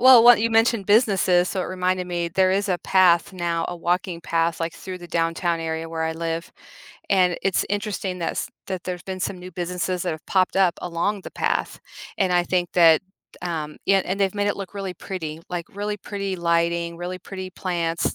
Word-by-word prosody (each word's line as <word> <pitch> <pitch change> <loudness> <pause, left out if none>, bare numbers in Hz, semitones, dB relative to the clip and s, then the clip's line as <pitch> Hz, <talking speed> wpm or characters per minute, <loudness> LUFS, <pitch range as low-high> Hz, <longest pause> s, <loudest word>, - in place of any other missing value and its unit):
Well, 255 -2 +9
what 240 -1 +8
you 230 - +1
mentioned 225 -2 +3
businesses, 195 -5 +4
so 190 -2 -2
it - - -3
reminded 185 0 -1
me, 175 -1 -2
there 185 +2 +3
is 200 +2 +1
a 180 - +2
path 180 -2 +4
now, 170 -2 -1
a 175 - -4
walking 175 0 -1
path 165 0 0
like 165 0 -2
through 185 -1 -7
the 175 - -10
downtown 165 +1 0
area 160 0 -3
where 165 0 -3
I 160 0 0
live. 165 0 -4 0.6
And 180 -3 +3
it's 195 -1 +1
interesting 205 -3 -2
that's, 170 +6 -2 0.2
that 185 -2 -4
there's 180 -1 -4
been 185 -1 -6
some 185 - -2
new 180 +1 -9
businesses 180 +1 -2
that 180 - -1
have 155 0 -7
popped 185 0 +2
up 185 -3 +4
along 180 +3 -1
the - - -8
path. - - -1 0.4
And 185 -2 +2
I 175 - +4
think 175 -1 0
that, 165 -3 +6 0.4
um, 160 -4 -4
yeah, 195 -1 +4
and 195 +2 -3
they've 195 0 +2
made 205 0 0
it 205 - 0
look 195 0 -7
really 195 -2 -4
pretty, 165 -4 -6
like 175 -1 -3
really 205 +1 -2
pretty 200 -1 -4
lighting, 170 0 0
really 180 +1 -4
pretty 185 0 -7
plants, 170 -3 -1
180 Hz, 205 wpm, -23 LUFS, 170-195 Hz, 0.6 s, Well